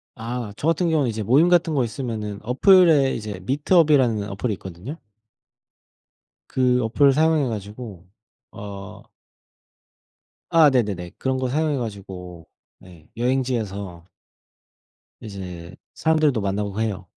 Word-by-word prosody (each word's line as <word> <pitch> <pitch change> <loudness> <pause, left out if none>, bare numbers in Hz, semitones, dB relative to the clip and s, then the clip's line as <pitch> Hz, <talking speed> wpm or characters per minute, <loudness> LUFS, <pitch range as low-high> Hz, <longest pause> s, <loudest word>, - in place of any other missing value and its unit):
아 115 -1 -5
저같은 165 +3 0
경우는 150 -6 +2
이제 110 0 -4
모임 140 - +4
같은 170 -3 +3
거 130 -3 +2
있으면은 110 -4 -5
어플에 150 - +5
이제 105 -3 -6
미트업이라는 140 - +3
어플이 105 +4 -2
있거든요. 95 - -8 1.6
그 125 -1 +2
어플을 135 +5 +3
사용해 155 -2 +2
가지고 105 -3 -7 0.5
어 100 -1 -9 1.5
아 160 -3 +7
네네네. 100 -9 -1
그런 130 0 -1
거 130 -1 -1
사용해 150 +2 0
가지고 95 - -7 0.3
네 85 -4 -17
여행지에서 110 -8 -2 1.2
이제 90 -5 -8 0.2
사람들도 155 -6 +2
만나고 100 +1 -2
해요. 100 -5 -3
115 Hz, 270 characters per minute, -22 LUFS, 100-140 Hz, 1.6 s, 아